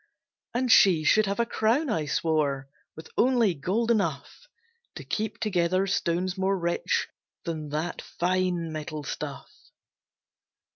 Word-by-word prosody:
And 250 0 +1
she 180 -8 +6
should 215 +6 +4
have 200 +3 -2
a 235 - +3
crown, 235 +7 +1
I 155 -6 -1
swore, 145 -3 0 0.3
With 160 +1 -11
only 240 -6 +4
gold 200 +10 0
enough 230 - -2 0.5
To - - -7
keep 220 0 -3
together 185 -2 +1
stones 185 0 -1
more 195 +1 +1
rich 170 -1 0 0.4
Than 155 -3 -4
that 155 +4 -3
fine 180 -2 -1
metal 155 -1 -5
stuff. - - -6
180 Hz, 130 wpm, -27 LUFS, 160-215 Hz, 0.5 s, she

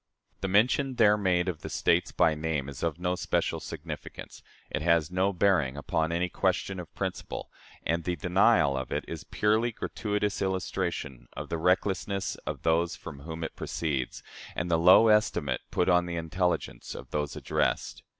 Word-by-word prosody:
The 95 - -2
mention 125 +7 +3
there 105 -3 +6
made 90 -3 +1
of 85 -4 -3
the - - -6
States 85 +1 +2
by 80 - +3
name 75 -3 -2
is 70 -2 -8
of 85 -2 -1
no 90 0 0
special 90 - -1
significance; - - -8 0.3
it - - -1
has 85 -1 +2
no 95 +2 +2
bearing 85 -8 +2
upon 80 +2 -1
any 85 +2 +1
question 95 +2 -1
of 85 - -8
principle; - - -4 0.3
and 85 +1 0
the 90 +1 -1
denial 90 -1 +3
of 65 -1 -4
it - - -2
is - - -5
a - - -17
purely 110 +3 +2
gratuitous 105 -2 -2
illustration 90 -9 -2
of - - -6
the 85 - -2
recklessness 95 +2 +1
of - - -4
those 85 +1 +2
from 70 -4 -9
whom 80 +3 -6
it 80 - -5
proceeds, 70 -6 -3 0.3
and 90 - -2
the 80 - +3
low 90 +6 +7
estimate 105 - +2
put 90 - +1
on 90 -1 +4
the 85 - -3
intelligence 90 +2 -2
of - - -9
those 75 -1 -2
addressed. - - -1
90 Hz, 175 wpm, -28 LUFS, 80-95 Hz, 0.3 s, low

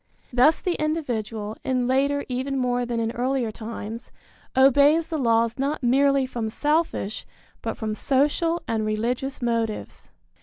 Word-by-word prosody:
Thus 260 +6 +5
the 360 - 0
individual, 225 -9 -2
in 255 -2 0
later 280 +3 +1
even 265 +2 -2
more 245 -1 0
than 235 -1 -2
in 225 0 -1
earlier 250 -1 -1
times, 225 +1 -7 0.5
obeys 285 +5 +5
the 320 -2 -2
laws 230 -1 +2
not 280 +1 -1
merely 275 +2 +3
from 235 -3 -3
selfish, 295 -4 -1 0.4
but - - -4
from 215 -1 -3
social 295 +8 +1
and 220 -1 0
religious 240 +5 -2
motives. 230 -2 -2
250 Hz, 140 wpm, -24 LUFS, 230-280 Hz, 0.5 s, Thus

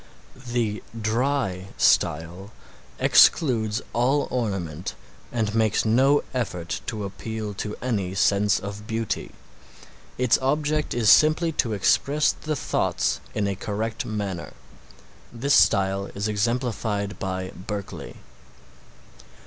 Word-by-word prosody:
The 115 -3 -1 0.2
dry 110 -4 -1
style 85 +6 +1 0.5
excludes 115 -6 +4
all 130 +5 +2
ornament 95 -9 -3 0.4
and 110 -3 -1
makes 110 -1 +2
no 135 +6 +4
effort 90 -9 -3
to 110 -2 -3
appeal 105 +1 -5
to 105 +2 -5
any 100 -7 -1
sense 100 +1 +3
of 100 +2 -7
beauty. 115 -1 -2 0.9
Its 125 -1 +3
object 150 +2 0
is 115 -3 +5
simply 155 +2 +5
to 115 -7 0
express 140 +9 +2
the 155 0 -4
thoughts - - 0 0.2
in 105 - 0
a 100 - 0
correct 110 +3 -3
manner. 100 -5 -4 0.8
This 135 +4 0
style 100 0 +3
is 100 +2 -1
exemplified 105 -2 -1
by 95 -1 -3
Berkeley. 100 +2 -7
110 Hz, 110 wpm, -24 LUFS, 100-125 Hz, 0.9 s, is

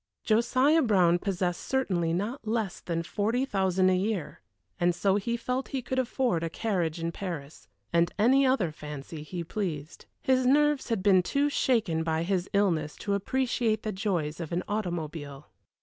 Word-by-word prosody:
Josiah 255 +8 +3
Brown 180 - +4
possessed 180 -2 -1
certainly 185 -11 0
not 215 +8 -3
less 220 -4 -1
than 165 -1 -3
forty 225 +9 0
thousand 190 -5 +2
a - - +3
year, 190 - -2 0.4
and 175 0 +2
so 195 +2 +2
felt 235 +4 -2
he 265 -2 -3
could 260 +2 -1
afford 245 -7 0
a 165 - -2
carriage 175 -5 -1
in 165 0 -2
Paris, 165 -6 -7 0.3
and 170 +1 +3
any 255 +6 +5
other 255 -11 +2
fancy 150 0 -8
he 170 +3 -5
pleased. 165 -4 -5
His 260 -1 +2
nerves 295 0 +3
had 225 -5 -1
been 190 -2 +5
too 280 +10 +1
shaken 220 -13 +1
by 160 0 0
his 185 0 -1
illness 170 -7 +1
to 200 - -3
appreciate 230 +1 0
the 215 - -2
joys 180 -6 -2
of 165 -3 -5
an 175 +1 -1
automobile. 160 -8 -4
190 Hz, 165 wpm, -28 LUFS, 170-235 Hz, 0.4 s, any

